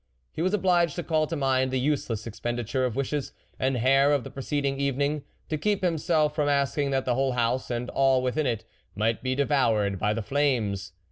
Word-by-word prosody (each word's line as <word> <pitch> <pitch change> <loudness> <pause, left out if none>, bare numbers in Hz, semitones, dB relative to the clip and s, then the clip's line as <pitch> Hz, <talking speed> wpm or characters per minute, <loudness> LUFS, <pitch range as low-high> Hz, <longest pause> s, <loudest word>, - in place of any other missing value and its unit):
He - - -4
was 185 +4 +2
obliged 175 -5 +2
to 175 - -3
call 155 -2 +1
to 165 - -3
mind 130 -2 +1
the 130 0 0
useless 125 -5 -1
expenditure 120 +2 -2
of 120 -3 -2
wishes 140 +1 -2 0.3
and 130 0 +1
hair 135 +4 +4
of 140 -4 +1
the - - -8
preceding 140 0 -2
evening, 140 +2 0 0.3
to 155 - -2
keep 205 +3 0
himself 160 -3 +1
from 150 -2 0
asking 140 0 +1
that 135 -1 0
the 125 - +1
whole 135 +1 +1
house, 120 +1 0
and 120 0 -2
all 135 -1 +3
with 125 -1 -1
n 155 -2 +1
it, 115 -3 -2 0.3
might 110 +2 0
be 130 0 -1
devoured 115 -9 +1
by 105 0 +1
the 115 - -3
flames. 105 -8 0
135 Hz, 205 wpm, -26 LUFS, 120-145 Hz, 0.3 s, hair